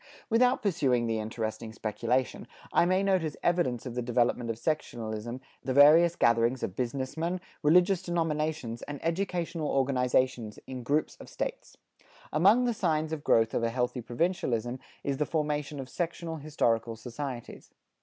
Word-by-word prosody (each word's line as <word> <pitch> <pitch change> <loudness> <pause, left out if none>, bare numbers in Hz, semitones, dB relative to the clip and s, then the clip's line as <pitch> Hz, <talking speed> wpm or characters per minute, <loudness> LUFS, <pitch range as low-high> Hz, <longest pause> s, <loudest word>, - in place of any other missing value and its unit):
Without 245 +2 +3
pursuing 135 - +2
the 115 -1 0
interesting 110 0 -4
speculation, 115 +4 -1 0.3
I - - +5
may 185 +2 +2
note 190 -2 +3
as 155 -3 -4
evidence 170 -10 +1
of 125 - -5
the 125 - -2
development 120 0 +1
of 115 - -1
sectionalism, 120 -4 -3 0.2
the 130 - -2
various 160 +4 +7
gatherings 115 0 +2
of 95 - -3
business 130 +1 -3
men, 170 +3 -1 0.2
religious 180 +4 +4
denominations 155 -8 -2
and 145 -1 -6
educational 170 -2 -1
organizations 130 -4 +1
in 130 -1 -6
groups 145 +5 0
of - - -12
States. - - -5 0.6
Among 200 +11 +5
the 240 - +1
signs 160 -6 0
of 150 -2 -4
growth 115 -5 +3
of - - 0
a 115 - +1
healthy 125 +1 -1
provincialism 120 -3 -1 0.2
is 140 -1 -1
the 150 - 0
formation 150 -2 -2
of 135 - -5
sectional 165 +2 -4
historical 115 -7 0
societies. 125 +2 -7
140 Hz, 155 wpm, -29 LUFS, 120-165 Hz, 0.6 s, various